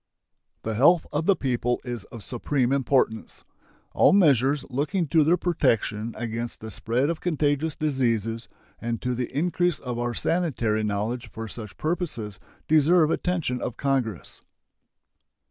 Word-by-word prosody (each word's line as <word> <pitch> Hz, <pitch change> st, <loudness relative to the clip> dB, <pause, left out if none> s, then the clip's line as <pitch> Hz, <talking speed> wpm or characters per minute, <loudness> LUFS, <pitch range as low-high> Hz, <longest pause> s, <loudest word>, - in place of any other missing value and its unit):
The 110 Hz, -, -2 dB
health 150 Hz, +9 st, +5 dB
of 150 Hz, +2 st, -1 dB
the 200 Hz, -, +5 dB
people 125 Hz, -3 st, -1 dB
is 120 Hz, -4 st, -5 dB
of 115 Hz, -4 st, -10 dB
supreme 125 Hz, +1 st, -1 dB
importance. 130 Hz, -4 st, 0 dB, 0.5 s
All -, -, +5 dB
measures 140 Hz, -, +4 dB
looking 160 Hz, +8 st, 0 dB
to 160 Hz, +1 st, +4 dB
their 165 Hz, +4 st, +3 dB
protection 115 Hz, -, 0 dB
against 115 Hz, 0 st, -4 dB
the 110 Hz, 0 st, -8 dB
spread 120 Hz, +7 st, 0 dB
of 170 Hz, -, -6 dB
contagious 155 Hz, -2 st, 0 dB
diseases 115 Hz, -6 st, -1 dB, 0.3 s
and 115 Hz, -1 st, -3 dB
to 125 Hz, 0 st, 0 dB
the 125 Hz, 0 st, -3 dB
increase 175 Hz, +3 st, +1 dB
of 125 Hz, -2 st, -5 dB
our 120 Hz, 0 st, -2 dB
sanitary 125 Hz, -12 st, 0 dB
knowledge 105 Hz, +3 st, -2 dB
for 115 Hz, 0 st, -7 dB
such 105 Hz, -1 st, -8 dB
purposes 150 Hz, -, -3 dB, 0.3 s
deserve 155 Hz, +1 st, +4 dB
attention 165 Hz, -10 st, -1 dB
of 120 Hz, -, -4 dB
Congress. 125 Hz, -, -2 dB
125 Hz, 140 wpm, -25 LUFS, 115-155 Hz, 0.5 s, health